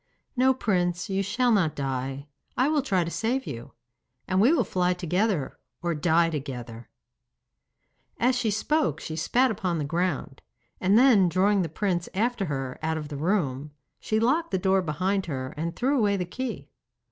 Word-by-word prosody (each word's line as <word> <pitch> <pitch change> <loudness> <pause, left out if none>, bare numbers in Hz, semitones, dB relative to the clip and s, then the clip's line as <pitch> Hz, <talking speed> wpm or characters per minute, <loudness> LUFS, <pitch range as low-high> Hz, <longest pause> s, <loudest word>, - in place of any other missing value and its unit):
'No, 260 +1 +4
Prince, 180 -4 -1
you 195 0 +1
shall 245 +5 +1
not 180 -9 +2
die. 135 0 -3 0.3
I 255 +3 +3
will 305 -2 +2
try 195 -10 +1
to 170 - -5
save 250 +7 -1
you. 115 +1 -7 0.5
And 185 0 +2
we 240 +7 +5
will 310 -8 +3
fly 180 -2 0
together 180 -3 -1 0.2
or 170 -1 0
die 165 +2 +2
together.' 125 -6 -6 1.3
As 250 +2 +3
she 245 -3 0
spoke 220 - 0
she 155 - -6
spat 245 +10 +2
upon 185 -4 -2
the 150 - -2
ground, 165 -4 -2 0.4
and 195 +3 +3
then 230 -8 +6
drawing 195 +3 +2
the 170 - -2
prince 175 0 -1
after 225 0 0
her 135 -5 -4
out 160 0 -1
of 150 -2 -6
the 145 - -6
room, 150 -4 -1 0.3
she 220 - 0
locked 290 +9 +1
the 190 - 0
door 190 +1 +2
behind 185 +4 -1
her 130 -4 -4
and 165 +2 -3
threw 270 +2 +1
away 205 -2 +2
the 180 - -2
key. 250 +8 -6
185 Hz, 175 wpm, -26 LUFS, 155-220 Hz, 1.3 s, then